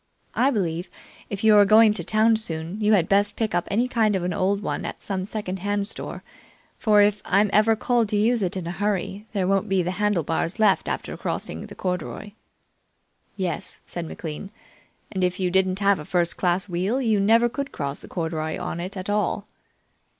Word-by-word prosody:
I 265 - +3
believe, 180 -7 -2 0.4
if 200 0 -5
you 215 -1 +6
are 205 - +8
going 215 +1 +6
to - - -2
town 220 +1 +3
soon, 175 -1 -4
you 210 +1 +4
had 175 -5 +3
best 205 +1 +2
pick 220 -4 -1
up 175 0 0
any 235 +5 +1
kind 220 -4 +2
of 185 - -1
an 180 0 -1
old 200 +4 0
one - - -2
at - - -5
some 190 -2 -3
second 195 -2 -4
hand 205 +1 -1
store, - - -7 0.6
for 210 -2 +5
if 205 0 +1
I'm 200 +1 +2
ever 220 +1 +5
called 235 -1 +1
to 210 - 0
use 230 +2 +2
it 185 0 -1
in 180 - -4
a 170 - -3
hurry 200 +2 -2
there 190 -3 0
won't 195 +1 +1
be 190 -2 +2
the 175 - -1
handlebars 170 -3 0
left 210 -4 +3
after - - -3
crossing - - -4
the - - -11
corduroy." 180 +3 -4 1.1
"Yes," 185 -4 -3
said 170 -2 -5
McLean; 160 +4 -6 0.6
"and 190 -1 -2
if 180 +1 0
you 180 -1 0
didn't 190 0 +2
have 200 -2 +3
a - - -6
first 170 0 0
class 180 +1 0
wheel, 190 +8 -1
you 220 -5 +2
never 225 +4 +4
could 280 +3 -4
cross 140 -1 -4
the - - -13
corduroy 160 -2 -3
on 170 - -4
it 185 +4 -5
at 185 - -5
all." 205 0 0
200 Hz, 200 wpm, -24 LUFS, 180-215 Hz, 1.1 s, are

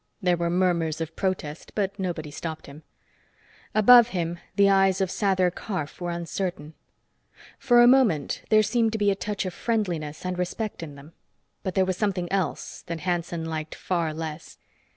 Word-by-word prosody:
There 180 -4 +2
were 170 0 -1
murmurs 170 -3 +1
of 165 -2 -5
protest, 180 -6 -3
but 200 -1 -1
nobody 170 -5 -3
stopped 160 +1 -6
him. 140 +2 -12 0.9
Above 235 +2 +8
him, 170 -5 -3 0.2
the 200 0 +5
eyes 195 -1 +4
of 190 -2 0
Sather 185 -3 +1
Karf 180 -7 -5
were 175 - -2
uncertain. 170 -2 -4 0.9
For 240 -1 +5
a - - +7
moment, 245 - +3
there 215 -1 +5
seemed 225 0 +1
to - - 0
be 205 -1 +3
a - - 0
touch 205 0 -3
of 185 - -4
friendliness 180 -10 -2
and 180 0 -3
respect 195 +4 -3
in 150 -4 -7
them, 145 +4 -14 0.5
but 185 - -4
there 190 - +3
was 185 -1 -2
something 185 -4 -1
else 195 -3 -2
that 165 -1 -4
Hanson 170 -2 -2
liked 160 -1 -4
far 170 -3 -1
less. 160 0 -7
180 Hz, 170 wpm, -25 LUFS, 165-200 Hz, 0.9 s, Above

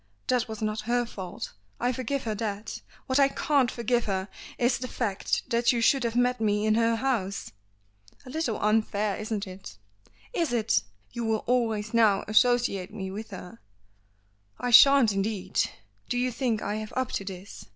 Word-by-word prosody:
That 250 -2 +1
was 220 -1 -6
not 215 0 -1
her 245 0 +2
fault; 190 -6 -7 0.3
I 245 - +1
forgive 260 +2 -2
her 220 - -2
that. 210 0 -4 0.2
What 260 +1 +1
I 275 - +6
can't 275 -2 +1
forgive 240 0 0
her, 190 -1 -2 0.3
is 245 +1 +2
the 255 - -4
fact 210 -6 -2
that 235 0 +3
you 240 - 0
should 265 +3 +3
have 230 -1 -1
met 245 0 +2
me 210 -1 +1
in 215 - +3
her 230 +1 +3
house." 225 -6 -2 0.7
"A 255 - -9
little 315 -7 -1
unfair, 215 -1 +1
isn't 215 -1 -3
it?" 185 - -10 0.6
"Is 330 -8 0
it? 225 - +2 0.3
You 235 - -4
will 220 -1 0
always 225 -3 0
now 220 -4 +4
associate 215 -4 +2
me 190 -3 -5
with 215 +3 -7
her!" 180 - -9 1.0
"I 245 - -1
shan't 275 -1 +8
indeed. 195 0 -1 0.5
Do 245 - 0
you 250 +1 +1
think 235 -3 -1
I 210 - -2
have 215 0 -6
up 260 -2 -1
to - - -2
this? 190 0 -9
225 Hz, 175 wpm, -27 LUFS, 210-245 Hz, 1.0 s, shan't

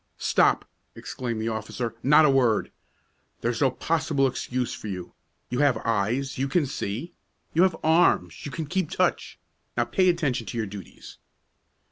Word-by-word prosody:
"Stop!" - - +2 0.3
exclaimed 120 -3 -4
the 110 +1 -1
officer. 110 +1 -4
"Not 150 +4 +6
a - - +5
word! 125 -5 +2 0.7
There's 120 +2 -1
no 135 - +5
possible 150 +1 0
excuse 125 -1 -2
for - - -7
you. 90 -3 -6 0.4
You 125 - -1
have 140 -5 +4
eyes; 115 +5 0
you 135 - +1
can 155 +2 +2
see. 130 - -4 0.4
You 165 - +3
have 185 -3 +3
arms; 160 +2 +3
you 145 - -5
can 160 +1 -4
keep 180 +1 -1
touch. - - 0 0.4
Now - - +2
pay 185 -1 +2
attention 145 - 0
to 120 - -5
your 110 - 0
duties." 100 -3 -11
130 Hz, 160 wpm, -26 LUFS, 115-155 Hz, 0.7 s, Not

